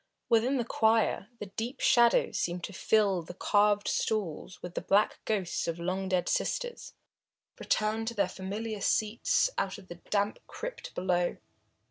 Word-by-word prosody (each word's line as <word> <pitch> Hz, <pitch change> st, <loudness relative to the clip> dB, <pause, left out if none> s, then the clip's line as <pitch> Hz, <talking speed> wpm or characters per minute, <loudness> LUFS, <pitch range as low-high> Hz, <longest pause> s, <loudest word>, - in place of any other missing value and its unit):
Within 240 Hz, +4 st, +3 dB
the 240 Hz, -, -1 dB
choir, 220 Hz, -3 st, +2 dB
the 210 Hz, -, -6 dB
deep 225 Hz, +6 st, -5 dB
shadows 235 Hz, -3 st, +4 dB
seemed 175 Hz, -2 st, -2 dB
to 200 Hz, -, -5 dB
fill 200 Hz, -1 st, +2 dB
the 170 Hz, +2 st, -10 dB
carved 205 Hz, +1 st, +2 dB
stalls 190 Hz, -4 st, -2 dB
with 180 Hz, -, -6 dB
the -, -, -3 dB
black 205 Hz, +2 st, +2 dB
ghosts 195 Hz, -5 st, -1 dB
of 165 Hz, 0 st, -2 dB
long 185 Hz, +2 st, -2 dB
dead 180 Hz, -2 st, +1 dB
sisters, 485 Hz, -1 st, -2 dB, 0.6 s
returned 220 Hz, +1 st, 0 dB
to 235 Hz, -, -3 dB
their 200 Hz, -3 st, +2 dB
familiar 205 Hz, +3 st, -5 dB
seats 220 Hz, -, +2 dB
out 195 Hz, -1 st, -2 dB
of 195 Hz, -2 st, -15 dB
the 175 Hz, 0 st, -9 dB
damp 205 Hz, 0 st, 0 dB
crypt -, -, -7 dB
below. 180 Hz, -1 st, 0 dB
205 Hz, 155 wpm, -30 LUFS, 185-225 Hz, 0.6 s, shadows